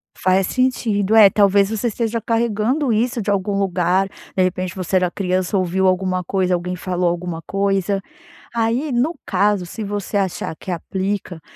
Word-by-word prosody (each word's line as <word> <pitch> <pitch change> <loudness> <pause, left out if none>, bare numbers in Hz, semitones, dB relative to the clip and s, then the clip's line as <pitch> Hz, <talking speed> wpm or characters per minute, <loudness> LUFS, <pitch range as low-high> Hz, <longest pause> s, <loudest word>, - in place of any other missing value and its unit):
Faz 185 0 +2
sentido. 225 -5 +1
É, 215 -3 +9
talvez 200 0 +3
você 220 +2 -1
esteja 230 0 -2
carregando 235 +4 0
isso 235 +2 0
de 205 - -3
algum 200 0 0
lugar. 185 0 +1 0.3
De 185 - +3
repente, 185 0 -2
você 185 0 0
era 180 -1 +2
criança, 185 +1 -1
ouviu 190 +1 +1
alguma 185 0 +1
coisa, 185 0 0
alguém 180 +1 -2
falou 180 0 -1
alguma 170 -1 -4
coisa. 195 +1 0 0.5
Aí, 235 +6 0
no 260 +8 0
caso, 205 -2 +1
se 215 +5 -6
você 205 0 -3
achar 190 -4 -2
que - - -10
aplica, 190 0 -3
195 Hz, 160 wpm, -20 LUFS, 185-220 Hz, 0.5 s, É